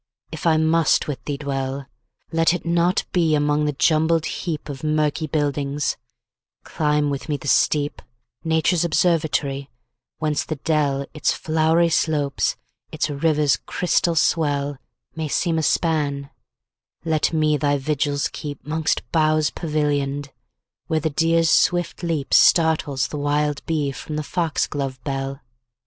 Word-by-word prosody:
if - - -3
I 160 -1 +4
must 160 0 +2
with 145 -3 -5
thee 145 -1 -3
dwell, 135 -1 -3 0.5
Let 165 +1 +3
it 175 - -7
not 170 +2 +1
be 165 -4 +2
among 150 0 +1
the 150 - +1
jumbled 160 +3 +2
heapOf 150 -6 -5
murky 155 0 0
buildings; 145 -2 -1 0.7
climb 150 -1 0
with 140 +3 -5
me 145 - 0
the 145 - -9
steep,—Nature's 150 +4 0
observatory—whence 150 -4 -1
the 155 - -4
dell, 140 -2 0
Its 150 - +1
flowery 160 +2 +2
slopes, 150 -4 0 0.4
its 150 - -1
river's 150 -1 +2
crystal 175 -1 0
swell, 145 -4 +1 0.4
May 160 -1 -3
seem 165 +2 0
a - - -1
span; 145 -3 0 0.7
let 155 -2 +1
me 155 -2 +2
thy 145 0 +1
vigils 145 +1 -1
keep'Mongst 150 +2 -3
boughs 155 -1 +2
pavillion'd, 145 -3 -1 0.6
where 160 - +1
the 155 +1 -2
deer's 165 +2 +2
swift 175 -1 +2
leapStartles 160 -3 +3
the 150 - -5
wild 145 0 0
bee 150 -4 0
from 150 +3 -7
the 155 - -2
fox 165 0 -1
glove 135 -3 -4
bell. 135 0 -4
150 Hz, 130 wpm, -22 LUFS, 145-160 Hz, 0.7 s, I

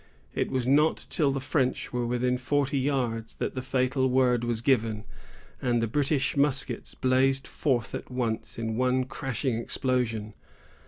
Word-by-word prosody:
It - - -1
was 130 -2 -1
not 150 +4 +3
till 145 -4 +2
the 135 - -1
French 130 -2 -1
were 120 -1 0
within 125 +1 0
forty 140 +1 +1
yards 125 -5 -1
that - - -3
the 130 - -3
fatal 130 0 +1
word 125 -2 +3
was 120 -2 -1
given, 115 -5 +1 0.6
and 120 -2 +2
the 115 - +1
British 140 +3 0
muskets 140 -1 0
blazed 135 +1 +2
forth 125 -6 -1
at - - -5
once 120 -3 -3
in 115 -1 -2
one 130 +1 +2
crashing 130 -2 -2
explosion. 115 -4 -1
130 Hz, 155 wpm, -28 LUFS, 120-135 Hz, 0.6 s, not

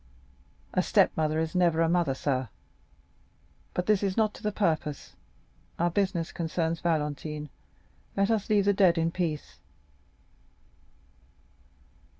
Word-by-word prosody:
"A - - +3
stepmother 155 0 +2
is 160 0 -1
never 175 -3 +2
a 165 - +4
mother, 170 -5 +1
sir. 130 -4 -1 1.3
But 180 - -1
this 210 -2 +3
is 195 0 -1
not 215 -2 +2
to - - -13
the 210 - -1
purpose,—our 170 -1 -3
business 185 -3 0
concerns 165 0 -2
Valentine, 150 -2 -2 0.7
let 195 +3 +2
us 220 -2 0
leave 205 -2 +3
the 205 - +4
dead 190 -4 +4
in 165 0 +1
peace." 165 -4 -3
170 Hz, 120 wpm, -28 LUFS, 155-195 Hz, 1.3 s, a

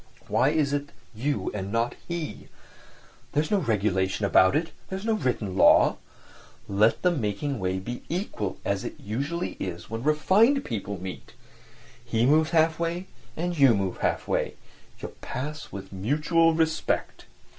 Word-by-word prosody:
"Why 135 - +3
is 150 -2 +1
it 145 0 -2 0.2
you 135 +7 -2
and 100 -1 -4
not 115 +2 0
he? 170 -3 -5 0.9
There's 150 +1 0
no 205 - +4
regulation 100 - 0
about 95 -1 +5
it; 165 +1 0 0.2
there's 190 +2 -5
no 225 - +2
written 120 - -1
law. - - +6 0.7
Let 105 +3 +2
the 180 - +4
making 135 - -2
way 95 -1 -1
be 120 +6 -5
equal 155 - -3
as 100 -1 0
it - - -7
usually 140 - -3
is 85 +1 -5
when 115 0 -3
refined 190 - +3
people 100 -4 -4
meet; 95 0 -8 0.7
he 120 -1 +1
moves 155 +3 +4
half 160 -1 +3
way 170 +2 -2 0.3
and 175 +2 -1
you 135 -5 +7
move 95 -2 -2
half - - -1
way; - - -1 0.4
you - - -6
pass 150 +4 -5
with 100 0 -8
mutual 155 - +2
respect." 160 -1 -1
135 Hz, 150 wpm, -26 LUFS, 100-160 Hz, 0.9 s, you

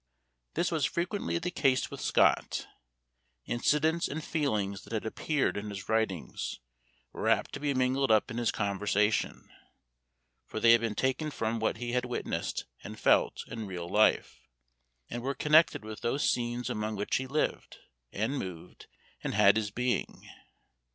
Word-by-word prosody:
This 175 - +1
was 160 -3 0
frequently 175 +1 -1
the 175 +1 -3
case 130 -7 +1
with - - -7
Scott; - - +2 0.8
incidents 155 +7 +1
and 155 +2 -5
feelings 105 - -1
that - - -11
had 110 - -2
appeared 145 +6 0
in 105 +1 -4
his 100 -2 -7
writings, 110 - -1 0.5
were - - -1
apt - - +2
to - - -4
be 145 -2 -1
mingled 130 +1 +2
up 110 +3 +3
in 115 - -3
his 120 -3 +1
conversation, 105 +1 0 1.0
for - - -4
they 115 +1 +6
had 115 0 +6
been 115 -2 -2
taken 130 +6 0
from 115 -5 -2
what 110 0 0
he 120 +1 -4
had 125 0 0
witnessed 125 - -3 0.2
and - - -8
felt - - +3
in 110 -2 -6
real 90 -2 -5
life, 105 +4 +2 0.7
and 120 - -5
were 135 +2 -2
connected 155 -7 +4
with 110 -1 -7
those 135 +5 0
scenes 120 0 -1
among 110 -3 -2
which 100 0 0
he 130 - -4
lived, 150 +4 -2 0.3
and 115 +8 -1
moved, 90 -2 -8 0.4
and - - -2
had 100 +1 +6
his 110 -1 0
being. 125 +4 -2
120 Hz, 160 wpm, -30 LUFS, 105-140 Hz, 1.0 s, they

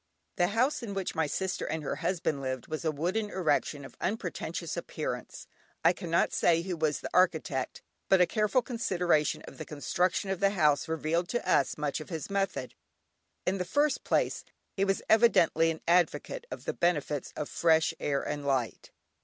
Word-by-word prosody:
The 175 - +3
house 245 +10 +1
in 210 -4 -5
which 195 -2 -2
my 160 -1 0
sister 190 +5 -2
and 155 0 -3
her 140 - -3
husband 165 -3 -1
lived 130 -2 -3
was 155 +1 -5
a 160 - +1
wooden 180 +8 -1
erection 150 -6 0
of - - -12
unpretentious 220 +3 -3
appearance. - - -5 0.4
I - - +7
cannot 170 -2 0
say 170 -1 +3
who 180 -1 -3
was 155 -2 0
the - - -5
architect, 160 -7 +1 0.3
but 190 - +6
a 180 - +6
careful 215 +7 +1
consideration 180 - 0
of - - -12
the - - -3
construction 180 +6 -1
of 190 - -2
the 200 0 +4
house 150 -2 +3
revealed 160 +2 -1
to 240 - -2
us - - +2
much 150 0 -2
of 155 - -9
his 165 +1 -5
method. 195 -10 -1 0.7
In 190 +1 0
the - - +1
first 290 +10 +1
place - - 0 0.3
he 195 - +1
was 195 0 0
evidently 190 -8 +5
an 160 -1 -4
advocate 180 - +1
of - - -7
the - - -1
benefits 150 -5 0
of 150 - -3
fresh 160 -1 +3
air 140 -1 0
and 145 -1 -3
light. 135 -5 -1
170 Hz, 180 wpm, -30 LUFS, 150-195 Hz, 0.7 s, I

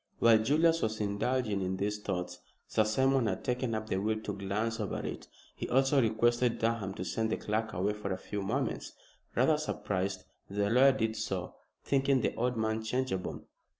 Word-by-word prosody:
While 115 -2 +6
Julius 160 +8 +3
was 110 0 -1
indulging 105 +1 0
in 95 0 -1
these 105 +2 -1
thoughts, 90 -3 -4 0.3
Sir 110 - +2
Simon 130 +2 +2
had 95 -3 -2
taken 125 -2 -1
up 110 0 -3
the 95 - 0
will 110 +3 0
to 105 - -4
glance 105 +4 -2
over 105 - -2
it. - - -6 0.3
He - - -5
also 135 +2 +4
requested 120 +2 +2
Durham 115 -4 -1
to 90 - -4
send 110 +2 -1
the - - +1
clerk 110 +1 -2
away 95 +4 0
for 105 -2 -5
a 95 - -1
few 100 +2 -5
moments. 120 +6 -2 0.4
Rather 135 +5 +4
surprised, 100 -8 -2 0.3
the 100 +1 0
lawyer 135 +3 +6
did 110 -3 -1
so, 100 -5 -3 0.3
thinking 135 -1 +2
the - - 0
old 125 +1 -1
man 110 0 0
changeable. 125 -5 -2
110 Hz, 185 wpm, -31 LUFS, 100-125 Hz, 0.4 s, While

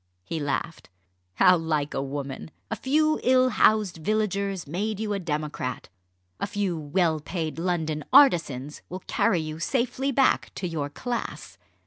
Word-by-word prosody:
He 160 - -4
laughed. 155 +3 -3 0.5
"How 180 - +6
like 155 -3 -1
a - - -1
woman! 140 +1 -5 0.2
A - - 0
few 310 +7 +2
ill 255 0 +4
housed 215 -7 +3
villagers 200 +1 -1
made 200 +7 -3
you 215 -1 -1
a 200 - -1
democrat. 150 -6 -4 0.5
A - - -1
few 200 -3 -1
well 160 +1 0
paid 160 0 -4
London 160 -4 -1
artisans 150 - +4
will 185 +1 -7
carry 175 - +2
you 155 0 -6
safely 255 - 0
back 270 0 +2
to 185 - -3
your 155 -4 -3
class. 240 - -5
175 Hz, 145 wpm, -26 LUFS, 155-215 Hz, 0.5 s, How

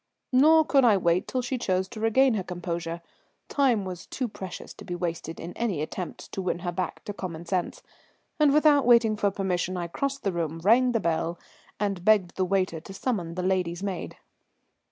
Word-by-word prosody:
Nor 310 +5 +6
could 275 -3 +4
I 220 -5 +6
wait 175 -1 +1
till 255 -1 -2
she 250 +1 -2
chose 190 -3 0
to 220 - -8
regain 240 +4 +4
her 210 - 0
composure. 170 -1 -4 0.5
Time 250 -8 +2
was 180 -2 -7
too 255 - -3
precious 190 -4 -8
to - - -12
be 175 - -5
wasted 170 -2 -4
in 175 - -7
any 220 -9 -1
attempts 170 +4 -5
to 195 - -4
win 180 -2 -1
her 175 - 0
back 180 +1 -4
to 205 - -5
common 175 -4 -6
sense, 175 0 -2 0.6
and 300 -2 +5
without 295 -3 +4
waiting 230 -3 +5
for 205 -1 +1
permission 185 -2 -2
I 175 - -2
crossed 275 +11 -3
the 195 - +1
room, 165 -2 -2
rang 245 +5 +4
the 230 - +2
bell, 170 -1 -1 0.4
and 200 -4 -1
begged 200 -4 +3
the 185 - +1
waiter 185 -3 0
to 185 +5 -11
summon 190 -8 -2
the 180 - -3
lady's 185 -1 0
maid. 190 -4 -4
190 Hz, 195 wpm, -27 LUFS, 175-235 Hz, 0.6 s, Nor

